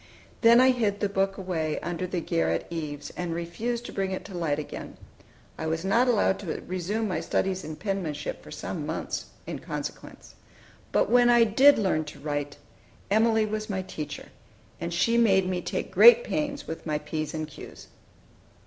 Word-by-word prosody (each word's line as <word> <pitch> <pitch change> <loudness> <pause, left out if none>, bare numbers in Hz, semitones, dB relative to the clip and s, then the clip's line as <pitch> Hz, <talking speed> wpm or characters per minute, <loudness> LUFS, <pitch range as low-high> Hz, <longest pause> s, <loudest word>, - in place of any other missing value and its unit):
Then 235 +1 +7
I 260 +1 +6
hid 215 -5 0
the 205 - +1
book 195 0 0
away 165 -5 -2
under 175 +2 -3
the 180 -1 -2
garret 80 - 0
eaves, 145 -3 -5
and 175 -2 -4
refused 225 +8 -3
to - - -7
bring 195 -1 -1
it 190 - -4
to - - -9
light 160 -4 0
again. 150 - -7 0.6
I 160 - -2
was 160 +2 -2
not 230 +6 +3
allowed 210 -5 +2
to 180 -6 -5
resume 185 +5 -2
my 180 -5 -1
studies 190 -1 -1
in 155 0 -6
penmanship 165 -7 -3
for - - -13
some - - -5
months, - - -3 0.2
in - - -5
consequence. - - -7 0.6
But - - +2
when 245 0 +6
I 240 -1 +6
did 260 +7 +6
learn 190 -7 +1
to 145 - -10
write, 145 0 -3 0.5
Emilie 220 +1 +4
was 215 0 -4
my 190 -2 -2
teacher, 150 -5 -7 0.5
and 170 0 -4
she 230 +7 +2
made 190 -5 +4
me 180 -1 -1
take - - -4
great 480 0 +8
pains 290 -8 -2
with 160 - -6
my 150 -1 0
p's 155 +1 -4
and 155 -1 -3
q's. 150 - -11
190 Hz, 180 wpm, -27 LUFS, 160-220 Hz, 0.6 s, great